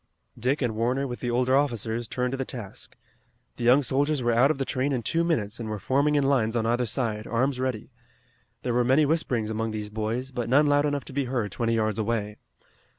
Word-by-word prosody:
Dick 135 Hz, +4 st, 0 dB
and 120 Hz, -3 st, 0 dB
Warner 125 Hz, +5 st, 0 dB
with 120 Hz, -2 st, -5 dB
the 120 Hz, -, -3 dB
older 125 Hz, +2 st, +2 dB
officers 120 Hz, -4 st, 0 dB
turned 125 Hz, +2 st, -2 dB
to 135 Hz, -, -2 dB
the 135 Hz, -, -1 dB
task. 120 Hz, -7 st, -8 dB, 0.6 s
The 120 Hz, -, -5 dB
young 130 Hz, +4 st, +6 dB
soldiers 140 Hz, +2 st, +1 dB
were 120 Hz, -, +2 dB
out 120 Hz, +4 st, +4 dB
of 155 Hz, -, 0 dB
the 135 Hz, -, -2 dB
train 130 Hz, +3 st, -1 dB
in 120 Hz, -3 st, -1 dB
two 165 Hz, +8 st, +1 dB
minutes 115 Hz, -12 st, -1 dB
and 115 Hz, -2 st, -4 dB
were 105 Hz, -, -3 dB
forming 140 Hz, +7 st, +1 dB
in 145 Hz, -, +3 dB
lines 125 Hz, -5 st, +2 dB
on 115 Hz, -1 st, +1 dB
either 120 Hz, +1 st, +1 dB
side, 110 Hz, -1 st, -2 dB
arms 125 Hz, +3 st, 0 dB
ready. 130 Hz, -2 st, -3 dB, 0.7 s
There 120 Hz, -, -1 dB
were 125 Hz, +1 st, +3 dB
many 135 Hz, +5 st, +4 dB
whisperings 125 Hz, -8 st, 0 dB
among 110 Hz, +1 st, -2 dB
these 105 Hz, -1 st, -5 dB
boys, 110 Hz, +5 st, -3 dB
but 120 Hz, -3 st, -3 dB
none 140 Hz, +4 st, +5 dB
loud 145 Hz, 0 st, +3 dB
enough 145 Hz, -1 st, -2 dB
to -, -, -10 dB
be 140 Hz, 0 st, 0 dB
heard 120 Hz, -6 st, -2 dB
twenty 115 Hz, +2 st, 0 dB
yards 110 Hz, -1 st, 0 dB
away. 105 Hz, -1 st, -2 dB
125 Hz, 225 wpm, -26 LUFS, 115-135 Hz, 0.7 s, young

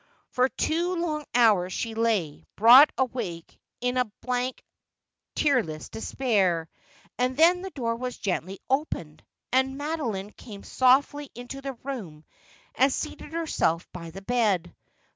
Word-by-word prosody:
For 255 Hz, +1 st, +2 dB
two 345 Hz, +6 st, -1 dB
long 310 Hz, -3 st, -2 dB
hours 210 Hz, -7 st, +4 dB
she 225 Hz, +4 st, -3 dB
lay, 220 Hz, -10 st, 0 dB
broad 245 Hz, +7 st, +8 dB
awake, 230 Hz, -11 st, -3 dB, 0.2 s
in 250 Hz, +1 st, 0 dB
a 250 Hz, -4 st, 0 dB
blank 250 Hz, 0 st, -2 dB, 0.7 s
tear 280 Hz, -5 st, +3 dB
less 155 Hz, -5 st, -8 dB
despair; 195 Hz, -9 st, 0 dB, 0.5 s
and 255 Hz, +1 st, 0 dB
then 345 Hz, +3 st, +5 dB
the 385 Hz, -, -5 dB
door 235 Hz, -8 st, -2 dB
was 250 Hz, +1 st, -5 dB
gently 190 Hz, 0 st, -3 dB
opened, 260 Hz, -, -2 dB, 0.3 s
and 265 Hz, +1 st, +1 dB
Mado 300 Hz, -1 st, -2 dB
line 200 Hz, -1 st, -4 dB
came 205 Hz, -4 st, -11 dB
softly 275 Hz, +3 st, +2 dB
into 245 Hz, +3 st, -8 dB
the 275 Hz, 0 st, -4 dB
room 195 Hz, -, -7 dB, 0.5 s
and 270 Hz, +1 st, +3 dB
seated 295 Hz, -, -5 dB
herself 300 Hz, -, 0 dB
by 170 Hz, -2 st, -8 dB
the 195 Hz, +4 st, -10 dB
bed. 200 Hz, -7 st, 0 dB
245 Hz, 140 wpm, -26 LUFS, 195-275 Hz, 0.7 s, broad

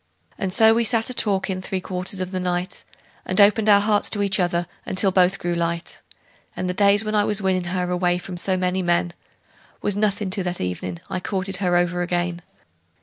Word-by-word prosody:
And 190 Hz, -2 st, -3 dB
so 220 Hz, +3 st, +6 dB
we 235 Hz, +1 st, +2 dB
sat 230 Hz, +1 st, +2 dB
a -, -, -2 dB
talkin' 195 Hz, -4 st, 0 dB
three 190 Hz, 0 st, -3 dB
quarters 185 Hz, +1 st, -4 dB
of 185 Hz, 0 st, -4 dB
the 185 Hz, -, -2 dB
night, 180 Hz, +1 st, -3 dB, 0.4 s
And 185 Hz, +2 st, -1 dB
opened 210 Hz, +1 st, +5 dB
our 200 Hz, -1 st, +7 dB
hearts 205 Hz, 0 st, +1 dB
to 205 Hz, -1 st, -1 dB
each 195 Hz, -1 st, +1 dB
other 175 Hz, -1 st, 0 dB, 0.2 s
until 190 Hz, +1 st, +1 dB
they 185 Hz, 0 st, +4 dB
both 185 Hz, +2 st, +2 dB
grew 175 Hz, 0 st, -3 dB
light; 170 Hz, 0 st, -3 dB, 0.5 s
And 185 Hz, -, -3 dB
the 180 Hz, -, -1 dB
days 200 Hz, +2 st, +3 dB
when 215 Hz, -, -2 dB
I 210 Hz, -1 st, +3 dB
was 210 Hz, 0 st, 0 dB
winnin' 190 Hz, -2 st, 0 dB
her 180 Hz, 0 st, -2 dB
away 180 Hz, 0 st, +1 dB
from 180 Hz, 0 st, -8 dB
so 185 Hz, +2 st, 0 dB
many 185 Hz, +1 st, 0 dB
men 175 Hz, -1 st, 0 dB, 0.7 s
Was 205 Hz, -, 0 dB
nothin' 205 Hz, -1 st, 0 dB
to 200 Hz, 0 st, +1 dB
that 180 Hz, 0 st, -3 dB
evenin' 90 Hz, -1 st, -4 dB
I 185 Hz, -, -3 dB
courted 190 Hz, 0 st, -1 dB
her 180 Hz, -2 st, 0 dB
over 175 Hz, 0 st, 0 dB
again. 175 Hz, 0 st, -2 dB
185 Hz, 210 wpm, -22 LUFS, 175-200 Hz, 0.7 s, our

